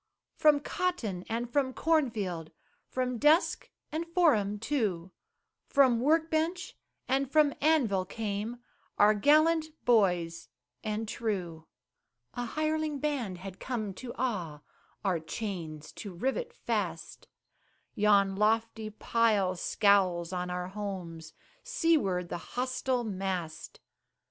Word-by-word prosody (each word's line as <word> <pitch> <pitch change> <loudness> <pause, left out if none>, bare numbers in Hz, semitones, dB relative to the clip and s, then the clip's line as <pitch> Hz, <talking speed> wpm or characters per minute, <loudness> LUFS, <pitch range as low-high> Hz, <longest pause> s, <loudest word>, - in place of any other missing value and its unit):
From 300 -2 +5
cotton 280 - -2
and 235 +2 -2
from 270 -3 +1
corn 315 -4 +2
field, 180 -8 -4 0.4
From 250 -2 -2
desk 305 +5 +3 0.2
and 325 +2 -3
forum 290 - +3
too, 205 -8 -1 0.6
From 260 -4 +4
work 320 +5 +2
bench 330 +4 -1 0.3
and 265 +1 +1
from 300 -2 +4
anvil, 245 -12 +3
came 215 +3 -4 0.4
Our 210 +1 +6
gallant 310 +8 +4 0.2
boys 175 - +2 0.3
and 215 +1 -2
true. 180 -8 -3 0.7
A 245 - -3
hireling 310 +2 -1
band 270 -10 -2
had 190 +1 -9
come 215 -6 -3
to 240 +5 -8
awe, 175 - -2 0.4
Our 185 -4 +2
chains 160 -3 -6
to 200 -4 -8
rivet 270 - -2
fast; 485 - -4 0.7
Yon 200 -2 +3
lofty 220 +1 +1
pile 215 -3 +1
scowls 185 -3 +2
on 180 0 -2
our 180 0 -3
homes, 185 -5 -6 0.3
Seaward 315 - +1
the 175 - -4
hostile 255 +3 -2
mast. 190 -6 -4
220 Hz, 115 wpm, -30 LUFS, 185-280 Hz, 0.7 s, Our